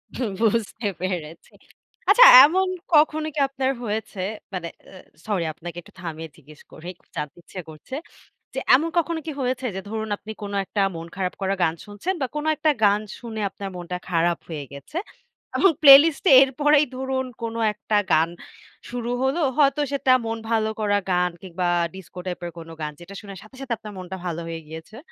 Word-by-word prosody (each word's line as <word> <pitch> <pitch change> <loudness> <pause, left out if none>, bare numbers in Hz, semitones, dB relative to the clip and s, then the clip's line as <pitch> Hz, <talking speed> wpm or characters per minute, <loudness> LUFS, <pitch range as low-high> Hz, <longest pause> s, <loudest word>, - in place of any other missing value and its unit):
হু, 255 - -2 0.2
বুঝতে 225 0 0
পেরেছি। 170 -4 -5 0.6
আচ্ছা, - - +9 0.2
এমন 370 +6 +3 0.3
কখনো 310 +1 +4
কি - - -5
আপনার 270 0 -1
হয়েছে? 215 -3 -4 0.3
মানে 175 -2 -3 0.2
এ - - -17 0.3
সরি! 200 -5 0
আপনাকে 170 +1 -9
একটু - - -19
থামিয়ে 165 -2 -6
জিজ্ঞেস 150 0 -17
করি, 160 - -12
খুব - - -33
জানতে 150 -1 -4
ইচ্ছে 185 - -8
করছে। 155 - -10 0.6
যে - - -3 0.2
এমন 305 +6 +3
কখনো 335 0 0
কি - - -2
হয়েছে? 255 0 -1
যে - - -3
ধরুন, 220 0 -4
আপনি 215 +2 -9
কোন 205 0 -5
একটা 205 - -3 0.2
মন 165 0 -7
খারাপ 185 -1 -2
করা 195 0 0
গান 160 - +2
শুনছেন 205 - -3
বা - - +1
কোন 300 - -2
একটা 310 +1 +2
গান 205 0 +4 0.2
শুনে 225 -3 -6
আপনার 200 0 -7
মনটা 180 0 -5
খারাপ 170 -1 +1
হয়ে 155 -4 -5
গেছে 140 - -10 0.6
এবং 390 - +5
প্লেলিস্ট 285 +1 +8
এ - - +7
এরপরেই 290 +3 +3
ধরুন 260 0 -2 0.2
কোনো 230 0 -3
একটা 210 +1 -2 0.2
গান 160 +1 +4 0.6
শুরু 240 -1 -4
হলো, 265 +6 +1 0.2
হয়তো 290 0 +4
সেটা 270 -2 +2
মন 225 0 -3
ভালো 220 -1 +2
করা 205 -1 +2
গান 180 0 +2
কিংবা 180 -1 -3 0.3
ডিস্কো 190 -1 -11
টাইপের 175 -1 -4
কোন 165 0 -10
গান, 150 0 -3
যেটা 175 +3 -11
শুনে 200 -2 -9
সাথে, 215 +5 -16
সাথে 250 -3 -2
আপনার 215 -1 -9
মনটা 185 0 -6
ভালো 170 -1 -3
হয়ে 165 0 -5
গিয়েছে? 160 +8 -10
210 Hz, 180 wpm, -23 LUFS, 175-265 Hz, 0.6 s, আচ্ছা